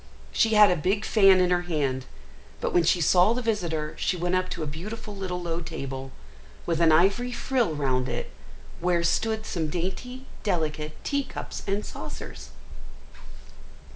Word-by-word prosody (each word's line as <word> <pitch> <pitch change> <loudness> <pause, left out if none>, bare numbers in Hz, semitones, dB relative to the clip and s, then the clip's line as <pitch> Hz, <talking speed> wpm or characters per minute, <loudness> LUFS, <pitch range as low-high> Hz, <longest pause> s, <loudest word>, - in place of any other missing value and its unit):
She 225 -1 +3
had 210 -2 +8
a - - +3
big 190 +6 0
fan 195 -3 +6
in 180 -1 +3
her 175 0 +3
hand, 140 -7 -1 0.5
but - - -2
when 175 - +5
she 170 +2 +3
saw 180 +6 +5
the 250 - -2
visitor 170 -9 -1
she 180 - 0
went 175 +1 -1
up 185 0 +1
to - - -4
a - - -2
beautiful 205 +8 -6
little 185 -2 -3
low 170 -1 -3
table, 135 -5 -6 0.6
with 165 -1 0
an 165 -1 +6
ivory 195 +10 +3
frill 240 -8 0
round 130 -3 0
it, - - -4 0.5
where 175 0 +1
stood 220 +5 0
some 160 -3 -2
dainty, 190 - -4 0.2
delicate 155 -5 -1
tea 280 -1 0
cups - - -7
and 200 +2 -1
saucers. - - -8
180 Hz, 165 wpm, -26 LUFS, 160-210 Hz, 0.6 s, had